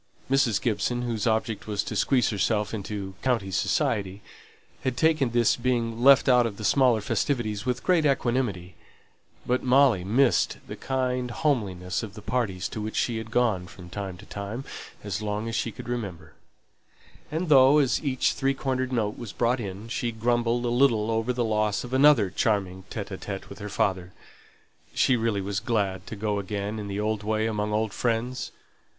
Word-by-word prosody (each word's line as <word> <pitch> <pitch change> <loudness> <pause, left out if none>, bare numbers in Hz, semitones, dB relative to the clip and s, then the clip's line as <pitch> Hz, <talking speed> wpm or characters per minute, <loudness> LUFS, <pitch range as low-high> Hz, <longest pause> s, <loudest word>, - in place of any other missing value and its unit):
Mrs. 130 -6 +3
Gibson, 120 +2 -1
whose 115 -1 -2
object 110 -1 -1
was 105 -2 -1
to - - -5
squeeze 125 -4 +2
herself 105 +1 0
into 100 -2 -5
"county 115 -7 0
society," 105 -4 0 0.6
had 130 -2 -1
taken 155 -2 +3
this 120 -1 +3
being 120 -2 -1
left 135 +1 +6
out 125 -2 +5
of 100 -3 -7
the 110 - -7
smaller 120 +1 +3
festivities 110 -1 -1
with 125 -1 -1
great 180 -3 +3
equanimity; 120 -10 0 0.7
but 125 +1 +1
Molly 130 -7 +4
missed 120 +7 +2
the - - -7
kind 125 -1 -1
homeliness 100 - -1
of 110 -3 -8
the 105 - -10
parties 110 -6 -1
to 110 - -5
which 110 +1 -5
she 120 -2 0
had 110 0 -8
gone 110 -7 +1
from 90 -1 -13
time 95 -3 -5
to - - -13
time 105 +6 -6 0.4
as 105 0 -3
long 105 +1 -2
as 115 - -4
she 115 - -1
could 110 - -10
remember; 110 -8 -5 1.0
and 165 +4 -2
though, 135 -1 +7
as 140 -1 +2
each 130 -3 +1
three 135 0 0
cornered 130 -1 -2
note 110 -4 -1
was 115 -4 -6
brought 120 +2 +1
in, 100 0 -6
she 120 0 -2
grumbled 120 +1 0
a - - +1
little 120 -3 +3
over 115 +2 0
the 120 -1 -1
loss 105 -2 0
of 125 +1 -8
another 130 -8 +5
charming 95 -4 0
evening 100 -2 -5
with 100 - -11
her 105 0 -6
father, 95 -2 -1 0.8
she 130 - +4
really 110 -4 0
was 100 +1 -2
glad 100 -5 -1
to 110 - -6
go 105 0 -1
again 100 +2 -4
in 105 - -5
the 100 0 -3
old 105 0 -1
way 110 +1 0
among 105 -1 -1
old 110 -1 0
friends. 120 +2 -1
115 Hz, 180 wpm, -26 LUFS, 100-125 Hz, 1.0 s, though